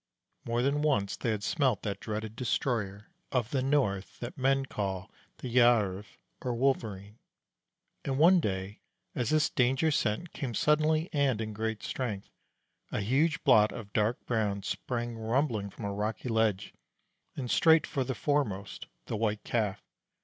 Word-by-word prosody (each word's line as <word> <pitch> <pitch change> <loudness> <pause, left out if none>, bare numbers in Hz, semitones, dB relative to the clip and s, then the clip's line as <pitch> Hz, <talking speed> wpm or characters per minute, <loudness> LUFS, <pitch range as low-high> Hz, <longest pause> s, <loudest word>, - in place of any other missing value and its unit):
More 120 +1 0
than 140 +2 +1
once 135 -10 +1
they 120 - -2
had 105 -2 -1
smelt 130 - +1
that 100 -2 -3
dreaded 110 0 -5
destroyer 115 - -2 0.2
of 125 -3 0
the 135 - +1
north 130 -9 0
that 120 - -6
men 135 +1 +2
call 95 -6 -4 0.3
the - - -6
Gjerv 105 -5 +3 0.2
or 125 -2 -2
Wolverene; 110 -5 -1 0.8
and 135 -1 -1
one 175 +5 +6
day, 95 - -3 0.3
as 120 -3 -1
this 155 -1 +2
danger 135 +5 +2
scent 145 +6 -1
came 125 -5 -4
suddenly 155 - +2
and 140 -6 +2
in 110 -1 -3
great 110 0 -3
strength, 110 -7 -4 0.6
a - - -1
huge 140 +10 +1
blot 110 -5 +6
of 105 -3 -9
dark 110 +3 0
brown 105 -4 -1
sprang 120 +2 -3
rumbling 110 -2 0
from 105 - -8
a 100 - -2
rocky 105 +4 -3
ledge, 110 -4 +1 0.6
and 125 -3 -4
straight 160 -1 +5
for 135 - -1
the 130 0 -3
foremost 110 -11 -1 0.2
the - - -3
White 105 -1 -1
Calf. 105 -5 -1
115 Hz, 155 wpm, -30 LUFS, 105-135 Hz, 0.8 s, one